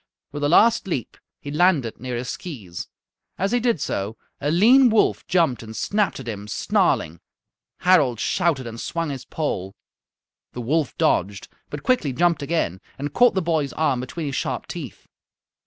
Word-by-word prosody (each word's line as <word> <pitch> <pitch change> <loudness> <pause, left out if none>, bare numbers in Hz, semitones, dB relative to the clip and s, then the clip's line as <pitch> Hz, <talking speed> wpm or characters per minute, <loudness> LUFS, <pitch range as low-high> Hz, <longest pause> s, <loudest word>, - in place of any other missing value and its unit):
With 145 0 -5
a 145 - +2
last 225 +5 +4
leap 135 -10 -3 0.2
he 145 - -7
landed 150 -7 +2
near 125 +1 -4
his 125 +1 -4
skees. 100 - -7 0.5
As 195 +3 0
he 245 - +2
did 235 -7 +1
so 105 -2 -3 0.2
a 145 - -1
lean 240 - +6
wolf 220 -1 +2
jumped 170 -8 +2
and 110 -1 -9
snapped 205 -6 0
at 130 - -9
him, 105 -2 -5
snarling. 85 -5 0 0.6
Harald 150 - +4
shouted 165 -6 0
and 115 0 -7
swung 165 -3 -2
his 135 -2 -6
pole. 95 - -3 0.8
The 125 - -5
wolf 145 +4 -1
dodged, 100 +2 0 0.2
but 145 -1 -7
quickly 205 - +1
jumped 170 +1 +2
again 140 - -1 0.2
and 145 +1 -4
caught 245 +2 +5
the 190 - +1
boy's 160 -4 0
arm 140 -5 +1
between 155 +6 -5
his 140 -2 -3
sharp - - -2
teeth. - - -8
145 Hz, 170 wpm, -23 LUFS, 120-175 Hz, 0.8 s, lean